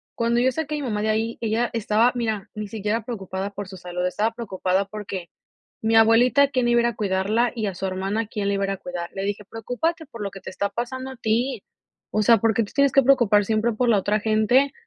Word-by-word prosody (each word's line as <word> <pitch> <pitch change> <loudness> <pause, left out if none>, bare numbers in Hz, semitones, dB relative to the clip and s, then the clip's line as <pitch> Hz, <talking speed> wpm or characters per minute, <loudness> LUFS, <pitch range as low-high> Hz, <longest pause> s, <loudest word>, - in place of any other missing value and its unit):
cuando 235 +1 +1
yo 255 +2 +3
saqué 305 +2 -3
a - - -2
mi - - -5
mamá 210 -5 -2
de 220 - 0
ahí, 225 +2 -1
ella 230 +1 0
estaba, 225 +2 +2
mira, 220 -4 -2
ni 210 0 -4
siquiera 215 +2 -2
preocupada 195 -3 -5
por 205 -1 -6
su 190 0 -10
salud, 180 0 -4
estaba 210 +5 0
preocupada, 195 -4 -1
porque 195 -4 -6 0.5
mi 220 +1 +1
abuelita, 240 +5 +5
¿quién 255 -3 0
iba 240 0 +4
a - - +2
ir 235 - +2
a 235 - -2
cuidarla 210 +4 +1
y 220 -3 -2
a 195 - -3
su 190 +1 -3
hermana 195 +4 -2
quién 205 -2 -3
le 200 - +1
iba 195 0 0
a - - +1
ir - - -3
a - - -3
cuidar? 175 -1 -6
Le 195 - -4
dije: 205 +1 -3
"Preocúpate 300 - -3
por 230 -5 -11
lo 200 - -3
que 195 - -11
te - - -8
está 200 +2 -2
pasando 260 +2 -4
a 265 - -9
ti. 235 +1 -1 0.5
O 215 - +1
sea, 230 +2 +6
porque 225 -1 +2
te 205 - -12
tienes 280 -1 +3
que 275 - +5
preocupar 240 -6 +4
siempre 220 +3 +1
por 245 +3 0
la 220 -3 +4
otra 210 +2 +1
gente, 220 +6 +3
220 Hz, 250 wpm, -23 LUFS, 200-240 Hz, 0.5 s, sea